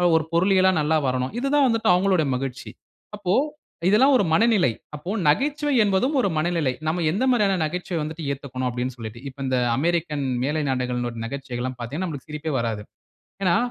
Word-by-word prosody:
ஒரு 160 Hz, -, +3 dB
பொருளியலா 190 Hz, +2 st, +4 dB
நல்லா 155 Hz, +2 st, +2 dB
வரணும்," 130 Hz, +3 st, -1 dB
இது 270 Hz, -, -1 dB
தான் 285 Hz, -2 st, +5 dB
வந்துட்டு 225 Hz, -2 st, +1 dB
அவங்களுடைய 180 Hz, -4 st, +2 dB
மகிழ்ச்சி. 130 Hz, 0 st, -5 dB, 0.5 s
அப்போ 185 Hz, -3 st, -1 dB, 0.6 s
இதெல்லாம் 260 Hz, +8 st, +5 dB
ஒரு 235 Hz, -, +2 dB
மனநிலை, 215 Hz, -, +4 dB, 0.3 s
அப்போ 150 Hz, +4 st, -8 dB, 0.2 s
நகைச்சுவை 290 Hz, -, +1 dB
என்பதும் 210 Hz, +9 st, +1 dB
ஒரு 200 Hz, -, +1 dB
மனநிலை, 155 Hz, -4 st, 0 dB
நாம 170 Hz, +2 st, 0 dB
எந்த 200 Hz, +9 st, -1 dB
மாதிரியான 200 Hz, -6 st, +2 dB
நகைச்சுவை 175 Hz, +2 st, -3 dB
வந்துட்டு 155 Hz, +1 st, -5 dB
ஏத்துக்கணும் 130 Hz, -2 st, -4 dB
அப்படினு 125 Hz, +1 st, -3 dB
சொல்லிட்டு, 115 Hz, 0 st, -7 dB
இப்போ 135 Hz, -, -16 dB
இந்த 130 Hz, -, +1 dB, 0.2 s
அமெரிக்கன் 155 Hz, -2 st, 0 dB, 0.2 s
மேலை 150 Hz, +3 st, 0 dB
நாடுகளிடைய 125 Hz, -2 st, -2 dB
நகைச்சுவைகள் 125 Hz, -1 st, -5 dB
எல்லாம் 130 Hz, -1 st, -4 dB
பார்த்தீங்கன்னா 145 Hz, +10 st, -3 dB
நமக்கு 145 Hz, -3 st, -8 dB
சிரிப்பே 150 Hz, 0 st, -4 dB
வராது. 115 Hz, -3 st, -2 dB, 0.6 s
ஏனா 175 Hz, -2 st, +4 dB
155 Hz, 165 wpm, -23 LUFS, 130-190 Hz, 0.6 s, தான்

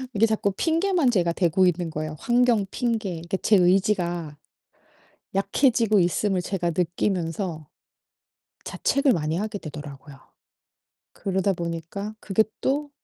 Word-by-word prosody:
이게 220 Hz, +3 st, +5 dB
자꾸 215 Hz, -2 st, 0 dB
핑계만 330 Hz, -, +1 dB
제가 170 Hz, -5 st, +1 dB
대고 180 Hz, +1 st, +2 dB
있는 175 Hz, -1 st, -1 dB
거예요, 155 Hz, 0 st, -4 dB
환경 240 Hz, -4 st, +2 dB
핑계. 225 Hz, -5 st, -1 dB
그러니까 170 Hz, +3 st, -4 dB
제 215 Hz, -, +5 dB
의지가 175 Hz, -4 st, +1 dB, 1.0 s
약해지고 215 Hz, +1 st, +2 dB
있음을 185 Hz, +2 st, +1 dB
제가 175 Hz, -2 st, -1 dB
느끼면서 175 Hz, -2 st, -2 dB, 1.0 s
자책을 275 Hz, -2 st, +1 dB
많이 155 Hz, -1 st, -1 dB
하게 210 Hz, +1 st, -3 dB
되더라고요. 145 Hz, -2 st, -9 dB, 0.9 s
그러다 195 Hz, 0 st, 0 dB
보니까 170 Hz, +5 st, -5 dB
그게 215 Hz, +2 st, +2 dB, 0.2 s
또 285 Hz, +2 st, -1 dB
190 Hz, 285 characters per minute, -24 LUFS, 170-220 Hz, 1.0 s, 이게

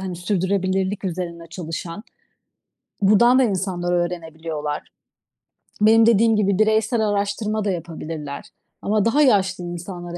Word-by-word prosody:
hani, 185 Hz, -2 st, -5 dB
sürdürülebilirlik 190 Hz, +1 st, -1 dB
üzerine 170 Hz, -2 st, -4 dB
çalışan. 165 Hz, +2 st, -6 dB, 1.0 s
Buradan 235 Hz, +6 st, +5 dB
da -, -, +5 dB
insanlar 185 Hz, -5 st, -1 dB
öğrenebiliyorlar. 160 Hz, -3 st, -3 dB, 1.0 s
Benim 220 Hz, +1 st, +6 dB
dediğim 225 Hz, 0 st, +4 dB
gibi 200 Hz, -2 st, +1 dB
bireysel 220 Hz, +1 st, +2 dB
araştırma 205 Hz, +1 st, -1 dB
da 200 Hz, -, +1 dB
yapabilirler 160 Hz, -4 st, -6 dB, 0.4 s
ama 210 Hz, 0 st, +1 dB
daha 270 Hz, +6 st, +3 dB
yaşlı 195 Hz, -9 st, +2 dB
insanlara, 175 Hz, 0 st, -7 dB
190 Hz, 110 wpm, -22 LUFS, 175-215 Hz, 1.0 s, Benim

